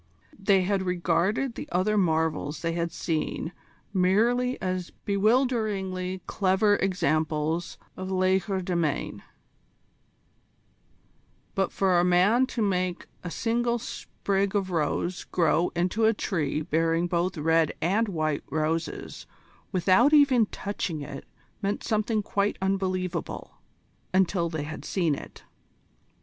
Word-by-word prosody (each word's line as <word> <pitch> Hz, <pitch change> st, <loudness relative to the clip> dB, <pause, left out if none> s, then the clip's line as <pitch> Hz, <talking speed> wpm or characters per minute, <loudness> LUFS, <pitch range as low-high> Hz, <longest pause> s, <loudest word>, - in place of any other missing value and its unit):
They 195 Hz, -1 st, +3 dB
had 195 Hz, +1 st, +1 dB
regarded 185 Hz, +7 st, 0 dB
the -, -, -7 dB
other 185 Hz, +4 st, +1 dB
marvels 160 Hz, -5 st, 0 dB
they 165 Hz, -, 0 dB
had 170 Hz, 0 st, -1 dB
seen 160 Hz, +1 st, -2 dB, 0.4 s
merely 230 Hz, +7 st, +2 dB
as 185 Hz, -1 st, -2 dB, 0.2 s
bewilderingly 200 Hz, -4 st, +1 dB
clever 205 Hz, +1 st, +2 dB
examples 160 Hz, -2 st, 0 dB, 0.2 s
of 185 Hz, 0 st, -5 dB
legerdemain: 185 Hz, -4 st, 0 dB, 2.3 s
but 195 Hz, -1 st, 0 dB
for 185 Hz, -3 st, +2 dB
a -, -, +3 dB
man 190 Hz, +8 st, +4 dB
to 235 Hz, -4 st, -2 dB
make 185 Hz, -3 st, -1 dB, 0.2 s
a 175 Hz, -, -4 dB
single 235 Hz, +6 st, 0 dB
sprig 200 Hz, -4 st, -2 dB
of 190 Hz, -2 st, 0 dB
rose 170 Hz, +2 st, -1 dB
grow 170 Hz, 0 st, +2 dB
into 185 Hz, +6 st, +1 dB
a 220 Hz, 0 st, +4 dB
tree 155 Hz, -6 st, -1 dB
bearing 165 Hz, +2 st, +1 dB
both 175 Hz, +1 st, -1 dB
red 160 Hz, 0 st, +3 dB
and 205 Hz, +7 st, +1 dB
white 155 Hz, -6 st, -1 dB
roses 160 Hz, +2 st, -2 dB, 0.4 s
without 190 Hz, -, +4 dB
even 270 Hz, -7 st, +5 dB
touching 180 Hz, -8 st, -4 dB
it 140 Hz, -1 st, -8 dB, 0.4 s
meant 200 Hz, 0 st, -1 dB
something 215 Hz, 0 st, 0 dB
quite 200 Hz, +1 st, 0 dB
unbelievable 185 Hz, -3 st, -2 dB, 0.6 s
until 185 Hz, -2 st, +2 dB
they 160 Hz, -3 st, -3 dB
had 155 Hz, +1 st, -7 dB
seen 170 Hz, -6 st, 0 dB
it. -, -, -8 dB
185 Hz, 115 wpm, -27 LUFS, 170-205 Hz, 2.3 s, even